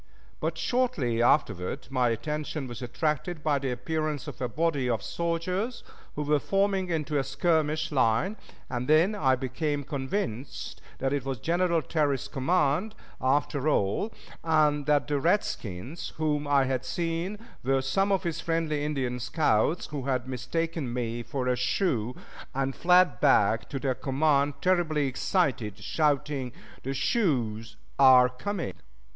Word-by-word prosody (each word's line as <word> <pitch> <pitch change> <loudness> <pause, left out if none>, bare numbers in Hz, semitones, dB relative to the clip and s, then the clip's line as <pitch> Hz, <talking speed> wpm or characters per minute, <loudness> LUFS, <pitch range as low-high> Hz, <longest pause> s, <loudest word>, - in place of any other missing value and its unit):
But - - -2
shortly 175 - 0
afterward 120 -2 +1
my 125 -2 +2
attention 150 +4 -3
was 120 0 -8
attracted 150 +6 -2
by 145 -2 +2
the 135 -1 -2
appearance 150 +4 -2
of 145 - -8
a 125 - -1
body 145 -1 0
of 115 -4 0
soldiers 180 +7 -2 0.3
who 150 - -2
were 150 0 +2
forming 195 +1 +1
into 155 -3 0
a - - 0
skirmish 155 +2 0
line 125 - +2 0.3
and 120 0 -3
then 160 +7 +4
I 135 -10 +3
became 145 +3 -2
convinced 135 - -4 0.2
that 135 +1 -1
it 140 -3 -1
was 135 -1 -3
General 170 +5 +1
Terry's 145 -2 0
command, 165 +8 +1 0.3
after 140 +2 +1
all, 105 - +1 0.3
and 150 -3 +2
that 145 -1 +3
the 145 -1 0
redskins 140 - -2
whom 150 -2 0
I 140 -1 +4
had 130 -1 -1
seen 170 +7 -2 0.3
were 135 +1 +1
some 195 +10 +1
of 195 - +2
his 165 -1 -2
friendly 160 -3 -1
Indian 130 -5 -2
scouts, 130 +2 +1
who 145 -4 -5
had 130 -2 -1
mistaken 135 +3 -2
me 120 -1 -2
for 125 +2 -3
a 125 - +2
Sioux, 125 - 0 0.4
and 135 0 -1
fled 180 -7 +4
back 110 +1 +3
to 140 - -3
their 135 -1 0
command 140 +2 +1
terribly 170 -5 +2
excited, 130 - 0
shouting, 140 +2 0 0.3
"The 135 +1 -3
Sioux 130 - +1 0.4
are 130 -2 +8
coming!" 170 +9 -4
145 Hz, 145 wpm, -28 LUFS, 130-165 Hz, 0.4 s, are